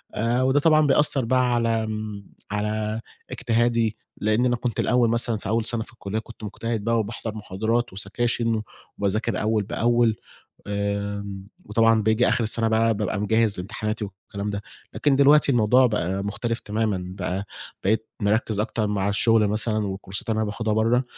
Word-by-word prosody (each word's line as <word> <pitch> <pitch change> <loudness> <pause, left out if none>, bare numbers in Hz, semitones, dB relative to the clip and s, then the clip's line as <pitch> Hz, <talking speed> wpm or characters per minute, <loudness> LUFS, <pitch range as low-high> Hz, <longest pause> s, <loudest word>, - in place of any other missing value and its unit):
آآ 120 +3 +1
وده 130 +2 +3
طبعًا 155 0 +4
بيأثر 140 -2 +3
بقى 125 0 +2
على 115 -1 +1
آمم 110 -2 -5 0.3
على 105 +1 -2 0.3
اجتهادي 115 -2 +1 0.2
لأن 110 +4 +1
أنا 120 -1 +2
كنت 120 -1 -3
الأول 125 -2 +3
مثلًا 115 -1 +1
في 100 - -6
أول 115 0 +1
سنة 115 0 +1
في 115 - -14
الكلّية 110 -1 -4
كنت 110 0 -13
مجتهد 115 +1 -3
بقى 115 +1 +2
وباحضَر 110 0 -4
محاضرات 110 +3 -1
وسكاشن 115 +3 0 0.4
وباذاكر 105 +3 0
أول 110 -1 +1
بأول، 120 +2 +2 0.5
آمم، 100 -1 -3 0.2
وطبعًا 115 +1 +3
باجي 110 +3 +3
آخر 115 - +2
السنة 115 +1 0
بقى 115 0 +3
بابقى 105 -1 -2
مجهِّز 110 -1 +1
لامتحاناتي 105 +3 -3
والكلام 100 +1 -6
ده. 100 0 -4 0.3
لكن 140 -2 +2
دلوقتي 140 +1 +5
الموضوع 125 +2 +5
بقى 100 -3 -1
مختلف 115 +3 -2
تمامًا 105 -3 -1
بقى، 95 +1 -3 0.4
بقيت 110 +3 +1
مركِّز 105 0 +1
أكتر 110 0 -1
مع 100 -1 0
الشغل 105 +1 +3
مثلًا 110 0 0
والكورسات 95 +1 -5
اللي 110 - 0
أنا 110 - +1
باخدها 110 +1 -2
برّه 115 +3 +2
110 Hz, 160 wpm, -24 LUFS, 105-115 Hz, 0.5 s, دلوقتي